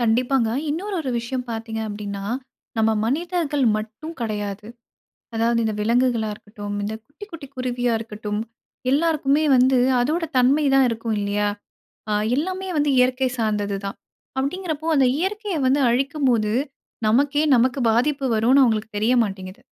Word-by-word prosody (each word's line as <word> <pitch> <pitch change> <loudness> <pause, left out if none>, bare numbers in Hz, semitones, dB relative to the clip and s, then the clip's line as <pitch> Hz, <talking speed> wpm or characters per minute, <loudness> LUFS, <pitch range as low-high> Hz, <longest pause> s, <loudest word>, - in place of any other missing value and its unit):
கண்டிப்பாங்க. 240 +1 +2 0.2
இன்னொரு 385 +7 -3
ஒரு 270 -5 -3
விஷயம் 250 +2 -4
பார்த்தீங்க 225 0 -4
அப்படின்னா, 205 -1 -5 0.5
நம்ம 220 0 +3
மனிதர்கள் 305 +1 0
மட்டும் 220 +10 -6
கிடையாது. 210 -2 -3 0.7
அதாவது 230 +1 +2
இந்த 220 -1 -1
விலங்குகளா 235 0 +2
இருக்கட்டும், 205 -1 -8
இந்த 210 +2 -3
குட்டி, 290 +8 -11
குட்டி 315 -4 -8
குருவியா 245 -1 -1
இருக்கட்டும். 210 -1 -4 0.5
எல்லாருக்குமே 300 -1 +2
வந்து 255 +1 +4 0.2
அதோட 315 +7 0
தன்மை 270 +5 +4
தான் 270 -1 +5
இருக்கும் 225 -1 -2
இல்லையா? 205 +1 0 0.6
ஆ - - +1 0.2
எல்லாமே 375 +5 -2
வந்து 295 -1 +2
இயற்கை 255 +1 +3
சார்ந்தது 210 -3 0
தான். 195 - -5 0.4
அப்படிங்கறப்போ 315 +2 -2
அந்த 265 -2 +5
இயற்கையை 400 0 -2
வந்து 275 +2 +3
அழிக்கும் 275 +3 0
போது 215 -2 +1 0.6
நமக்கே, 285 +6 +3
நமக்கு 255 +3 +2
பாதிப்பு 275 +4 +1
வரும்ன்னு 250 +5 +4
அவங்களுக்கு 220 -2 0
தெரிய 230 +4 +2
மாட்டேங்குது. 190 -2 -6
245 Hz, 135 wpm, -22 LUFS, 220-290 Hz, 0.7 s, தான்